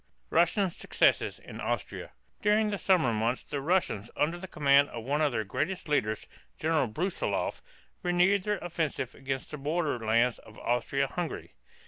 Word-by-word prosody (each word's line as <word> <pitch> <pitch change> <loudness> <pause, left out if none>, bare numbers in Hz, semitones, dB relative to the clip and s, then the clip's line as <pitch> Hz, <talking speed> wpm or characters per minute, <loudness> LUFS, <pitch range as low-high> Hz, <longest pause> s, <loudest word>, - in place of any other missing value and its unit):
RUSSIAN 180 +2 +3
SUCCESSES - - +2
IN - - -10
AUSTRIA. - - -3 0.3
During 210 0 +3
the 200 - -2
summer 170 -11 +3
months 115 +3 0
the 145 -2 -4
Russians 145 - 0
under 165 +4 +1
the 190 - -7
command 140 -3 +4
of 115 - -6
one 145 +5 0
of 150 -2 +3
their 110 -2 -1
greatest 155 - -2
leaders, 110 -8 0 0.3
General 155 -4 +2
Bru´silov, 175 - -2 0.4
renewed 180 +2 +3
their 210 +2 -1
offensive 160 -8 -2
against 135 -1 -4
the 150 - -5
border 150 -2 0
lands 115 +2 +2
of 110 - -15
Austria 125 +3 0
Hungary. 170 +3 -5
150 Hz, 155 wpm, -29 LUFS, 125-175 Hz, 0.4 s, command